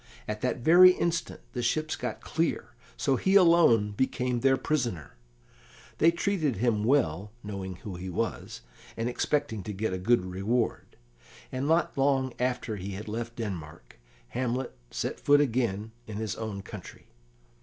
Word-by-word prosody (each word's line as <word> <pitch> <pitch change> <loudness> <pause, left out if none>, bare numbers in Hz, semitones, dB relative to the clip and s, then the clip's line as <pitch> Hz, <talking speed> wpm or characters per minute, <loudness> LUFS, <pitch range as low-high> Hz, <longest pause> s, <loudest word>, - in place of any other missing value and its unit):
At 105 0 -4
that 125 - 0
very 180 +6 +8
instant 170 -2 -2
the 125 - -2
ships 155 +6 0
got - - -5
clear, 165 0 -1 0.3
so 135 -2 +1
he 190 +7 +2
alone 165 - +6
became 125 +2 0
their 135 +1 +3
prisoner. 120 - -2 0.8
They 165 - +6
treated 170 - 0
him 110 0 +1
well, 105 - +1
knowing 95 -3 -5
who 95 0 -8
he 95 +1 -6
was, 95 - -3 0.4
and 115 +1 -1
expecting 125 -2 -1
to 105 - -6
get 100 0 -2
a 95 - -2
good 115 0 +2
reward, 100 +6 -2 0.6
and 130 +2 -2
not 165 +1 +2
long 135 -2 +2
after 125 -3 -1
he 100 +1 -5
had 105 +3 -7
left 115 +2 -4
Denmark 85 - -7 0.3
Hamlet 125 - -2
again - - -32
set - - -3
foot 145 0 +5
in 115 -6 0 0.2
his 110 -1 -4
own 105 -3 -5
country. - - -10
120 Hz, 155 wpm, -28 LUFS, 100-140 Hz, 0.8 s, very